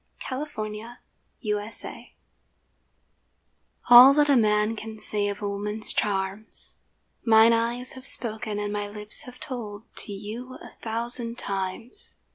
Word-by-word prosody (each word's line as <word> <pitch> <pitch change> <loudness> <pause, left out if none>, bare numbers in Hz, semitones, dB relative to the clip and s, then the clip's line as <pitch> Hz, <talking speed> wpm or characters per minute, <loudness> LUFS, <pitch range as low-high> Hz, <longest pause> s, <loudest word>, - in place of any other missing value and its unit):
A - - -2
BACHELOR 285 +3 -3
TO 290 - -7
A 215 - -3 0.8
MARRIED 210 +1 -3
FLIRT - - -6 2.0
ALL 255 +3 +10
that 295 0 +3
a - - +5
man 215 -1 +2
can 220 0 -8
say 210 -1 0
of 205 0 -5
woman's 210 +1 -2
charms, 195 +1 -1 0.5
Mine 225 0 +6
eyes 235 +2 -1
have 260 +1 0
spoken 215 -2 +3
and 205 0 -3
my 205 0 -3
lips 210 +7 -6
have 250 -1 -12
told 220 -5 -7
To - - -5
you 220 +6 -7
a - - -12
thousand 235 +1 -1
times. 195 - -1
220 Hz, 140 wpm, -25 LUFS, 205-240 Hz, 2.0 s, ALL